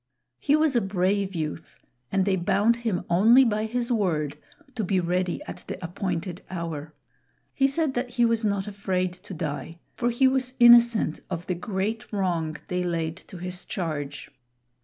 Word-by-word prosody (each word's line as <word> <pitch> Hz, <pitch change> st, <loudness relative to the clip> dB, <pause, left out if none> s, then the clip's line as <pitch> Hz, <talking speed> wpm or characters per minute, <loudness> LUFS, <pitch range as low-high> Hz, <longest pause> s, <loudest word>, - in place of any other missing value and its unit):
He 290 Hz, -, +3 dB
was 310 Hz, -3 st, +2 dB
a 240 Hz, -, +4 dB
brave 195 Hz, 0 st, 0 dB
youth, 155 Hz, 0 st, -5 dB, 0.3 s
and 195 Hz, -1 st, +2 dB
they 195 Hz, -1 st, +2 dB
bound 205 Hz, +6 st, +2 dB
him 225 Hz, -7 st, -2 dB
only 225 Hz, +9 st, +6 dB
by 215 Hz, -1 st, 0 dB
his 240 Hz, +2 st, -1 dB
word 160 Hz, -, 0 dB, 0.4 s
to 230 Hz, -3 st, -2 dB
be 190 Hz, 0 st, +1 dB
ready 180 Hz, 0 st, -1 dB
at -, -, -8 dB
the -, -, -4 dB
appointed 180 Hz, 0 st, -3 dB
hour. 165 Hz, -4 st, -5 dB, 0.6 s
He 270 Hz, -, +3 dB
said 280 Hz, 0 st, 0 dB
that 245 Hz, 0 st, -2 dB
he 240 Hz, -1 st, +2 dB
was 230 Hz, -1 st, +1 dB
not 200 Hz, -2 st, 0 dB
afraid 190 Hz, -3 st, -2 dB
to 180 Hz, +1 st, -10 dB
die; 160 Hz, +1 st, -4 dB, 0.2 s
for 240 Hz, -, 0 dB
he 245 Hz, +3 st, +3 dB
was 260 Hz, -1 st, 0 dB
innocent 235 Hz, -7 st, +6 dB
of 170 Hz, +1 st, -4 dB
the 185 Hz, -, -1 dB
great 205 Hz, +5 st, -3 dB
wrong 170 Hz, -6 st, -1 dB
they 180 Hz, 0 st, -1 dB
laid 165 Hz, -2 st, -2 dB
to 185 Hz, -, -10 dB
his 180 Hz, +1 st, -6 dB
charge. 145 Hz, -5 st, -4 dB
190 Hz, 170 wpm, -26 LUFS, 175-235 Hz, 0.6 s, only